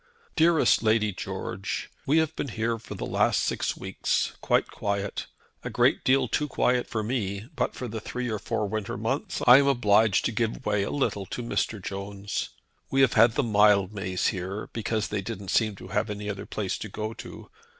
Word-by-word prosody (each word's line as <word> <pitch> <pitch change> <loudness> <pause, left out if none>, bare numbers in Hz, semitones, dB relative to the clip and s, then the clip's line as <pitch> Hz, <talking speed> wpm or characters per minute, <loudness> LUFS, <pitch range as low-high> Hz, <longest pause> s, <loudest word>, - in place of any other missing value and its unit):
"DEAREST 165 -1 +4
LADY 110 -2 +2
GEORGE, 95 +1 -4 0.2
We 145 +4 +4
have 160 -1 +1
been - - -3
here 115 0 -2
for 115 - -9
the - - -4
last - - +2
six - - -1
weeks, - - -1
quite - - +1
quiet. 100 -1 -3 0.4
A - - -3
great - - +2
deal 130 0 +3
too 150 +5 0
quiet 125 -2 +1
for 110 -2 -2
me, 105 -3 -2
but - - -1
for 125 - -5
the 110 -1 -5
three 125 +2 -4
or 110 -3 -2
four 105 - -2
winter 110 0 -3
months, - - -2
I 125 +1 +10
am 140 - +2
obliged 110 -6 +3
to - - +1
give 115 0 -2
way 105 -1 +1
a 100 - -1
little 100 -9 -1
to 120 - -5
Mr. 115 -2 -1
Jones. 100 +1 -4 0.4
We 135 - +2
have 130 -4 +4
had 115 +1 +6
the 145 - +1
Mildmays 100 -4 +3
here, 95 +2 -5
because 110 -2 -1
they 105 -2 -2
didn't 100 0 -6
seem 110 -3 +2
to 95 - -11
have 105 +2 0
any 105 0 -5
other 100 0 -7
place 100 -4 -3
to 110 - -6
go 110 +3 -4
to. - - -10
110 Hz, 195 wpm, -27 LUFS, 100-120 Hz, 0.4 s, I